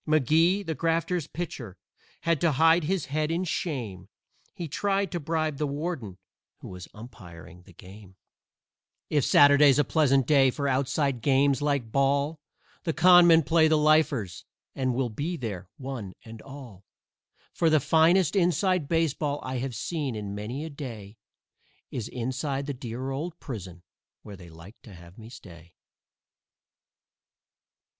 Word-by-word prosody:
McGee, 160 - +2
the 160 - -2
Grafters' 165 0 -1
pitcher, 125 - -7 0.4
had 165 -3 0
to 165 -3 +2
hide 160 +3 +4
his 185 0 -1
head 150 +2 -2
in 170 +3 -1
shame 115 - -4 0.4
He 170 - -6
tried 195 +3 -1
to 175 - -3
bribe 155 -1 -2
the 150 - 0
warden, 140 - -5 0.4
who - - -11
was 90 -2 -9
umpiring 90 -6 -13
the 90 0 -18
game. 95 +2 -14 1.0
If 145 -3 +2
Saturday's 145 -1 +6
a 145 - +4
pleasant 135 -3 +2
day 135 -1 +4
for 140 +2 -3
outside 135 -1 0
games 140 +1 +2
like 140 -6 -1
ball 140 +4 +1 0.4
The 165 - -1
Con 175 +2 +7
Men 165 -1 +6
play 160 +1 +3
the 155 0 +3
Lifers, 150 - +1 0.3
and 130 -2 -1
we'll 130 -1 -1
be 160 +10 -4
there, 100 - -6
one 130 -8 -7
and 110 -1 -11
all. 130 -9 -12 0.7
For 165 - +2
the 155 -1 +4
finest 165 +6 +3
"inside" 180 -2 +1
baseball 155 -3 0
I 130 -1 -4
have 130 -1 -4
seen 145 -6 -3
in 105 -2 -5
many 115 +9 -5
a 160 - -7
day 115 -8 -9 0.7
Is 115 -3 -4
inside 130 +3 -3
the 145 - -4
dear 125 +1 -6
old 160 +5 -5
prison, 90 -9 -8 0.4
where 105 - -10
they 90 -2 -13
like 85 +7 -15
to 105 -5 -14
have 85 +4 -15
me 110 0 -11
stay. 85 -8 -14
140 Hz, 150 wpm, -26 LUFS, 115-160 Hz, 1.0 s, Con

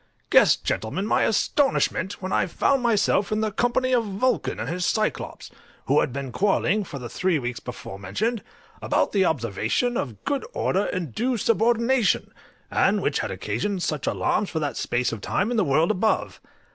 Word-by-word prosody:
Guess, - - +6
gentlemen, 150 - -3
my - - +2
astonishment, 220 - +1
when 185 - -3
I - - +2
found 270 +9 +1
myself 210 -4 +2
in 215 0 +1
the 215 -1 0
company 245 +4 +1
of 240 -2 +3
Vulcan 215 +5 -1
and - - -3
his 180 +2 -2
Cyclops, 215 +4 -2 0.3
who - - +3
had - - 0
been 135 0 -5
quarrelling, 200 - +1
for 145 - -7
the 125 -2 -6
three 180 +7 0
weeks 120 -3 -4
before 100 -5 -8
mentioned, 215 - -2 0.4
about - - +1
the 195 -2 +3
observation 130 - 0
of 115 -7 -5
good 280 -1 -1
order 195 +3 0
and 170 -9 -3
due 250 +1 0
subordination, 235 +2 +2 0.4
and - - +2
which - - 0
had - - -2
occasioned 200 -3 -2
such 150 -3 -2
alarms 210 - 0
for - - -4
that 150 -2 -2
space 120 0 -1
of 115 -3 -6
time 205 - -1
in 240 - 0
the 215 - +3
world 160 +4 +2
above. 215 +2 0
195 Hz, 180 wpm, -24 LUFS, 145-230 Hz, 0.4 s, Guess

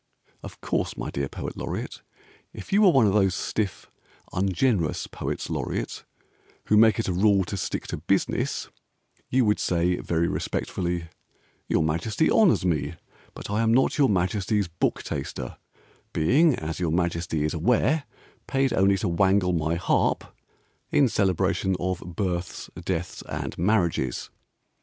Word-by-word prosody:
Of - - -10
course, - - -2
my - - -4
dear 70 -1 -2
Poet - - -6
Laureate, - - -5 0.5
If 95 - -8
you 205 - +5
were 200 - +7
one 135 -9 +5
of 100 - +2
those 95 -3 +3
stiff 105 -4 -3 0.4
ungenerous 95 -1 +1
Poets - - -4
Laureate - - -3 0.6
Who 105 - +3
make 110 0 +6
it 115 - -1
a 95 - 0
rule 100 +1 +4
to 100 - -4
stick 95 - -3
to - - -3
business, - - -1 0.6
You 130 -1 +3
would 105 0 +2
say 90 0 +1
very 85 0 0
respectfully, 85 -2 -2 0.6
"Your - - +2
Majesty 85 - 0
honours 195 - +4
me, 80 -5 0 0.4
But - - -7
I 105 +2 +1
am 115 0 +3
not 135 +4 +2
your 135 -3 +5
Majesty's 100 +1 +1
Book 85 +1 -1
Taster, - - -5 0.6
Being, 140 - +4
as 80 -2 -5
your 85 -3 0
Majesty 85 -2 0
is 75 - -1
aware, 125 - +2 0.4
Paid 135 -1 +1
only 95 +1 +3
to - - -1
wangle 95 +1 +2
my 80 0 0
harp 85 - 0 0.5
In 140 -4 +4
celebration 95 -1 +1
of 90 0 -1
Births, 90 0 -4
Deaths, 90 -2 -3
and - - -4
Marriages. 85 - 0
95 Hz, 145 wpm, -25 LUFS, 85-110 Hz, 0.6 s, were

